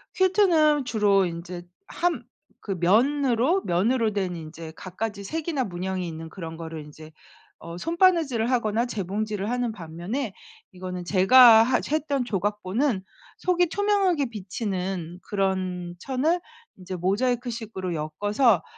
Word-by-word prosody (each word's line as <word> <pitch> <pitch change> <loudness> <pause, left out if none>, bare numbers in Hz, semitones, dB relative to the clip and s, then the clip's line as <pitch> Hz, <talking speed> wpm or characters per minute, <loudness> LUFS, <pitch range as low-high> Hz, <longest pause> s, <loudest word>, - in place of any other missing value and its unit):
퀼트는 345 -7 +3
주로 205 -4 +3
인제 175 +1 -6 0.2
함 350 0 -1 0.4
그 205 - -6
면으로 255 - +3
면으로 220 +6 +1
된 190 -3 -2
이제 160 0 -9
갖가지 200 +2 -5
색이나 310 - -2
문양이 185 -2 -3
있는 160 -1 -6
그런 165 -2 -8
거를 160 -2 -7
인제 155 +1 -13 0.5
어 170 +1 -8
손바느질을 330 - +2
하거나 235 -2 +1
재봉질을 210 -1 -3
하는 245 -2 -1
반면에 190 - -5 0.4
이거는 180 -1 -6
제가 225 +5 +7
하 255 +3 +2
했던 285 -4 0
조각보는 210 +2 -1 0.3
속이 360 -1 +2
투명하게 390 -5 +1
비치는 190 -4 -4
그런 185 -3 -2
천을 290 - 0 0.4
이제 185 0 -6
모자이크 240 +7 0
식으로 210 -6 -5
엮어서 205 - +1
210 Hz, 290 characters per minute, -25 LUFS, 180-260 Hz, 0.5 s, 제가